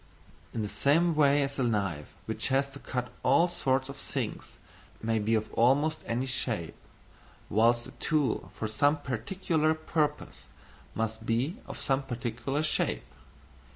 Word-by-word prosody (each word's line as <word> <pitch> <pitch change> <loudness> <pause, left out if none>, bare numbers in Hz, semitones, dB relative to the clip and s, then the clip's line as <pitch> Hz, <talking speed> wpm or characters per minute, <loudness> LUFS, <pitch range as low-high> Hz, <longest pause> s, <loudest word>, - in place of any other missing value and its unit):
In 110 - -2
the - - -2
same 165 +10 +3
way 145 -2 +4
that 140 0 -5
a - - +2
knife 100 -10 -1
which - - -2
has 135 +1 +2
to 140 - -9
cut 125 -3 -3
all 140 +7 +5
sorts 130 -6 0
of 140 - -7
things 130 -5 -4 0.4
may 115 0 0
be 110 +2 +2
of 110 -1 -2
almost 145 +6 +3
any 120 +3 0
shape; 120 -9 -2 0.8
whilst 120 +2 +4
a - - -10
tool 150 -7 0
for 110 - -2
some 145 +8 +3
particular 155 - 0
purpose 155 -1 -2 0.5
must 110 0 -2
be 130 - 0
of - - -7
some 135 0 +1
particular 125 +2 -2
shape. 155 - 0
130 Hz, 150 wpm, -29 LUFS, 115-145 Hz, 0.8 s, all